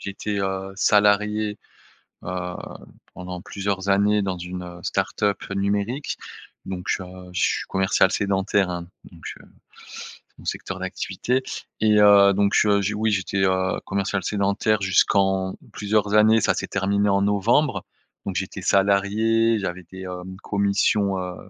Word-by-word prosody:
j'étais, 100 Hz, +1 st, -4 dB
heu, 95 Hz, 0 st, -3 dB
salarié, 105 Hz, +1 st, +2 dB, 0.7 s
heu, 90 Hz, 0 st, -4 dB, 0.6 s
pendant 90 Hz, 0 st, -7 dB
plusieurs 100 Hz, -1 st, -3 dB
années 100 Hz, +1 st, +3 dB
dans 95 Hz, -2 st, -2 dB
une, 90 Hz, +1 st, -6 dB
heu, 90 Hz, 0 st, -10 dB
start-up 100 Hz, +3 st, -1 dB
numérique, 100 Hz, +7 st, -1 dB, 0.5 s
donc, 90 Hz, -1 st, -6 dB
heu, 95 Hz, -, -7 dB, 0.3 s
je 90 Hz, -, -2 dB
suis -, -, +1 dB
commercial 95 Hz, 0 st, +2 dB
sédentaire, 100 Hz, -1 st, +1 dB
hein, 85 Hz, -1 st, -5 dB, 0.2 s
donc, 85 Hz, -2 st, -16 dB, 0.2 s
heu. -, -, -16 dB, 0.9 s
C'est -, -, -57 dB
mon -, -, -14 dB
secteur -, -, -4 dB
d'activité, 130 Hz, +2 st, -2 dB, 0.4 s
et 105 Hz, -1 st, +4 dB
heu, 100 Hz, -1 st, +7 dB
donc, 100 Hz, +1 st, +2 dB
heu, 100 Hz, -1 st, +3 dB, 0.2 s
oui, 110 Hz, +1 st, 0 dB
j'étais, 95 Hz, 0 st, 0 dB
heu, 95 Hz, 0 st, 0 dB
commercial 100 Hz, 0 st, -2 dB
sédentaire 100 Hz, +1 st, 0 dB
jusqu'en 95 Hz, 0 st, +2 dB, 0.2 s
plusieurs 105 Hz, 0 st, 0 dB
années, 110 Hz, +1 st, +5 dB
ça -, -, +2 dB
s'est -, -, -3 dB
terminé 100 Hz, +1 st, 0 dB
en 100 Hz, 0 st, +2 dB
novembre. 105 Hz, -, +1 dB, 0.4 s
Donc 95 Hz, -, -3 dB
j'étais 95 Hz, +1 st, -4 dB
salarié, 105 Hz, +4 st, +2 dB
j'avais 90 Hz, -2 st, -4 dB
des, 95 Hz, 0 st, -9 dB
hem, 90 Hz, 0 st, -7 dB
commissions, 100 Hz, 0 st, +1 dB
heu, 90 Hz, -1 st, -5 dB
100 Hz, 140 wpm, -23 LUFS, 95-105 Hz, 0.9 s, heu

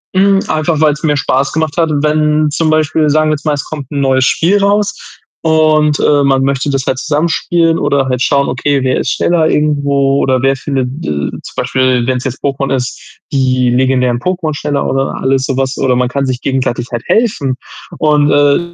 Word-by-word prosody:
Hm, 195 Hz, +1 st, +4 dB
einfach 155 Hz, 0 st, -1 dB
weil's 150 Hz, 0 st, +1 dB
mir 150 Hz, -2 st, +1 dB
Spaß 135 Hz, 0 st, 0 dB
gemacht 160 Hz, 0 st, -2 dB
hat, 165 Hz, -2 st, +2 dB
wenn 150 Hz, 0 st, +1 dB
zum 160 Hz, +1 st, 0 dB
Beispiel 155 Hz, 0 st, +1 dB
sagen 155 Hz, +1 st, +2 dB
wir -, -, +2 dB
jetzt 150 Hz, -, -6 dB
mal, 150 Hz, -, +1 dB
es 145 Hz, -, -3 dB
kommt 145 Hz, -3 st, -8 dB
'n 145 Hz, -, -2 dB
neues 130 Hz, -1 st, +2 dB
Spiel 175 Hz, +9 st, +2 dB
raus 205 Hz, +1 st, +1 dB, 0.5 s
und, 155 Hz, -2 st, +2 dB
äh, 145 Hz, -1 st, +3 dB
man 135 Hz, -1 st, +2 dB
möchte 135 Hz, +1 st, -1 dB
das 135 Hz, -1 st, -2 dB
halt 130 Hz, -, 0 dB
zusammen 155 Hz, +4 st, -1 dB
spielen 165 Hz, 0 st, +1 dB
oder 140 Hz, -2 st, 0 dB
halt 125 Hz, -1 st, -1 dB
schauen, 140 Hz, +1 st, +2 dB
okay, 140 Hz, +2 st, 0 dB
wer 130 Hz, -1 st, +1 dB
ist -, -, -1 dB
schneller 165 Hz, -2 st, +1 dB
irgendwo 140 Hz, -3 st, +1 dB
oder 130 Hz, -2 st, +1 dB
wer 135 Hz, +1 st, +2 dB
findet 135 Hz, -1 st, -2 dB, 0.2 s
de -, -, -2 dB, 0.2 s
zum -, -, -10 dB
Beispiel, 125 Hz, -1 st, 0 dB
wenn's 130 Hz, -1 st, -1 dB
jetzt 130 Hz, 0 st, -5 dB
Pokémon 135 Hz, -1 st, -1 dB
ist, 125 Hz, -1 st, -5 dB
die 130 Hz, -2 st, +1 dB
legendären 125 Hz, -1 st, +1 dB
Pokémon 175 Hz, -1 st, -2 dB
schneller 145 Hz, -1 st, -2 dB
oder 135 Hz, 0 st, -1 dB
alles 130 Hz, 0 st, 0 dB
so 135 Hz, -, -2 dB
was, 135 Hz, 0 st, -1 dB
oder 130 Hz, -1 st, +1 dB
man 125 Hz, 0 st, 0 dB
kann 140 Hz, +1 st, -2 dB
sich 130 Hz, -1 st, -3 dB
gegenseitig 130 Hz, -3 st, -2 dB
halt 120 Hz, -1 st, -4 dB
helfen 200 Hz, -, 0 dB, 0.4 s
und, 150 Hz, -1 st, +2 dB
äh, 145 Hz, +1 st, +3 dB
140 Hz, 200 wpm, -13 LUFS, 130-155 Hz, 0.5 s, Hm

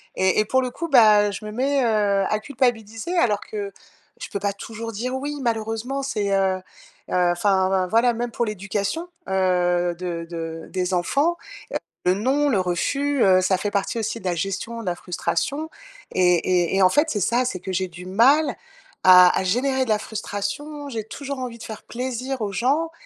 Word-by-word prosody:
et 190 Hz, +2 st, +2 dB
et 215 Hz, -, +3 dB
pour 260 Hz, +4 st, +2 dB
le 255 Hz, -, -2 dB
coup, 335 Hz, +6 st, -4 dB
bah, 215 Hz, -6 st, +6 dB
je 200 Hz, +2 st, -7 dB
me 210 Hz, -, -6 dB
mets, 270 Hz, +4 st, +1 dB
heu, 205 Hz, -4 st, +2 dB
à 215 Hz, -, +1 dB
culpabiliser 240 Hz, -, -1 dB
alors 210 Hz, -9 st, +2 dB
que 205 Hz, -2 st, -6 dB, 0.5 s
je -, -, -6 dB
peux 200 Hz, -, -3 dB
pas 200 Hz, 0 st, -1 dB
toujours 225 Hz, +2 st, -7 dB
dire: 250 Hz, +5 st, -3 dB
«oui» 290 Hz, +2 st, -4 dB
malheureusement. 230 Hz, +3 st, -2 dB
C'est, 210 Hz, -7 st, -1 dB
heu 190 Hz, -1 st, +1 dB, 0.5 s
heu, -, -, -2 dB
enfin, 180 Hz, +2 st, +2 dB
voi 190 Hz, -1 st, +1 dB
voilà. 230 Hz, +4 st, +3 dB
Même 235 Hz, +1 st, -3 dB
pour 235 Hz, -, -1 dB
l'éducation, 210 Hz, -, -3 dB, 0.2 s
heu, 180 Hz, -2 st, +1 dB
de 170 Hz, -2 st, -4 dB
de 165 Hz, -1 st, -6 dB
des 185 Hz, 0 st, -1 dB
enfants, 285 Hz, -, +1 dB, 0.7 s
heu, 180 Hz, -, +5 dB
le 190 Hz, -, -4 dB
non, 280 Hz, +6 st, +2 dB
le 205 Hz, -7 st, +2 dB
refus, 275 Hz, +10 st, 0 dB
heu, 185 Hz, -1 st, +5 dB
ça 185 Hz, 0 st, +2 dB
fait 205 Hz, +2 st, -3 dB
partie 200 Hz, +4 st, -1 dB
aussi 225 Hz, +1 st, -3 dB
de 190 Hz, -, -14 dB
la 180 Hz, -1 st, 0 dB
gestion 195 Hz, +6 st, -3 dB
de -, -, -9 dB
la 180 Hz, -1 st, -1 dB
frustration 280 Hz, -, -2 dB, 0.4 s
et 180 Hz, -1 st, +4 dB
et 175 Hz, 0 st, +1 dB
et 195 Hz, -, +3 dB
en 185 Hz, -, +7 dB
fait, 300 Hz, -, +2 dB
c'est 205 Hz, -6 st, -1 dB
ça, 240 Hz, +7 st, +2 dB
c'est 190 Hz, -7 st, -3 dB
que 190 Hz, -, -5 dB
j'ai 185 Hz, 0 st, -1 dB
du 175 Hz, +1 st, -11 dB
mal 260 Hz, +11 st, +4 dB, 0.5 s
à 180 Hz, -1 st, +8 dB
à -, -, -1 dB
générer 260 Hz, +7 st, +1 dB
de 230 Hz, -, -9 dB
la 215 Hz, -, +3 dB
frustration. 225 Hz, +8 st, -5 dB
J'ai 225 Hz, -4 st, -4 dB
toujours 280 Hz, +2 st, -6 dB
envie 245 Hz, -2 st, -5 dB
de 225 Hz, -, -11 dB
faire 220 Hz, -2 st, -8 dB
plaisir 255 Hz, +1 st, -4 dB
aux 205 Hz, -2 st, -2 dB
gens. 275 Hz, +11 st, 0 dB
215 Hz, 200 wpm, -23 LUFS, 185-255 Hz, 0.7 s, à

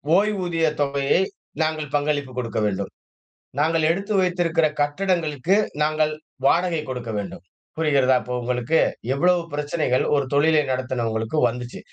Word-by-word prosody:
ஓய்வூதிய 185 Hz, -5 st, +1 dB, 0.2 s
தொகையை 140 Hz, +4 st, +2 dB, 0.4 s
நாங்கள் 155 Hz, -2 st, -1 dB
பங்களிப்பு 145 Hz, -2 st, 0 dB
குடுக்க 115 Hz, -3 st, -2 dB
வேண்டும். 100 Hz, -1 st, -2 dB, 0.7 s
நாங்க 160 Hz, +2 st, +2 dB
எடுத்து 195 Hz, +4 st, -2 dB
வைத்திருக்கிற 175 Hz, -3 st, +1 dB, 0.2 s
கட்டடங்களுக்கு 165 Hz, 0 st, 0 dB, 0.3 s
நாங்கள் 155 Hz, 0 st, +1 dB, 0.3 s
வாடகை 170 Hz, +1 st, +2 dB
குடுக்க 125 Hz, -3 st, -5 dB
வேண்டும் 100 Hz, -2 st, -6 dB, 0.3 s
புரிகிறதா? 140 Hz, -5 st, +3 dB
இப்போ 125 Hz, -, -6 dB
உங்களுக்கு? 125 Hz, +5 st, 0 dB, 0.3 s
எவ்வளவு 175 Hz, +5 st, +3 dB
பிரச்சனைகள் 145 Hz, -3 st, 0 dB
ஒரு 140 Hz, -1 st, +1 dB
தொழிலை 155 Hz, +2 st, +4 dB
நடத்துனவங்களுக்கு 120 Hz, -1 st, -2 dB
வந்துச்சு 125 Hz, 0 st, -7 dB
150 Hz, 115 wpm, -23 LUFS, 130-165 Hz, 0.7 s, தொழிலை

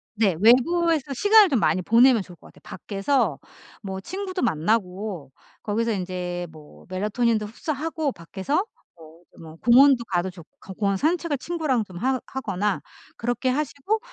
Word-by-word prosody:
네. 205 Hz, -5 st, +2 dB
외부에서 295 Hz, +5 st, +3 dB
시간을 410 Hz, -, +6 dB
좀 260 Hz, -6 st, +2 dB
많이 185 Hz, -, +1 dB
보내면 235 Hz, +3 st, +5 dB
좋을 180 Hz, -, -14 dB
것 -, -, -17 dB
같아요. -, -, -19 dB
밖에서 200 Hz, -, -1 dB, 0.4 s
뭐 190 Hz, -1 st, -5 dB
친구도 375 Hz, -, -5 dB
만나고 185 Hz, -, -1 dB, 0.3 s
거기서 225 Hz, +2 st, -1 dB
이제 180 Hz, -2 st, -4 dB
뭐 155 Hz, -2 st, -16 dB
melatonin도 215 Hz, +3 st, 0 dB
흡수하고 305 Hz, +6 st, -3 dB
밖에서 190 Hz, -, -4 dB, 0.4 s
뭐 160 Hz, 0 st, -16 dB, 0.2 s
뭐 160 Hz, -1 st, -11 dB
공원도 250 Hz, +3 st, +5 dB
가도 185 Hz, -2 st, -1 dB
좋고 180 Hz, +2 st, -13 dB
공원 200 Hz, -2 st, +1 dB
산책을 320 Hz, -, 0 dB
친구랑 300 Hz, -6 st, -1 dB
좀 185 Hz, -4 st, -12 dB
하 260 Hz, +4 st, 0 dB
하거나 210 Hz, -6 st, -2 dB, 0.4 s
그렇게 245 Hz, +2 st, -1 dB
하시고 295 Hz, -, -1 dB
225 Hz, 345 characters per minute, -24 LUFS, 185-280 Hz, 0.4 s, 시간을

